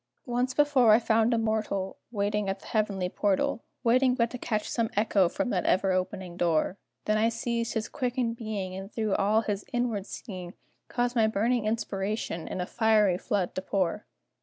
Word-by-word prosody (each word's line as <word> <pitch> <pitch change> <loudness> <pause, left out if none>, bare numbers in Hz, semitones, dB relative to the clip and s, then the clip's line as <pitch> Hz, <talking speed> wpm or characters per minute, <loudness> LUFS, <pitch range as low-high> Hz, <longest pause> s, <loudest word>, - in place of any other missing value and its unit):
Once 250 0 -1
before 280 -6 +5
I - - +8
found 225 0 +2
a 235 - +2
mortal 215 -4 -1
Waiting 205 -1 0
at 195 0 -2
the - - -15
heavenly 200 -4 0
portal 200 +4 0 0.2
Waiting 250 +2 +4
but 235 -2 +1
to 250 - -6
catch 215 -3 -2
some 230 -2 0
echo 205 -4 +3
from 285 +2 -2
that 180 - 0
ever 190 +1 +3
opening 185 -1 -2
door; 170 +2 +1 0.3
Then 215 0 +2
I 225 +1 +3
seized 230 0 -2
his 220 -1 -1
quickened 250 -4 -1
being, 210 -5 -4
And 195 +2 -7
through 220 -3 -1
all 210 +3 +3
his 205 -2 -3
inward 235 -5 -1
seeing, 185 -5 -7 0.3
Caused 245 0 -1
my 225 -2 +4
burning 220 +2 +1
inspiration 205 -5 -2
in - - -4
a 180 - -1
fiery 210 -4 +3
flood 190 -4 -1
to 185 - -3
pour! 190 0 -1
215 Hz, 185 wpm, -28 LUFS, 195-235 Hz, 0.3 s, I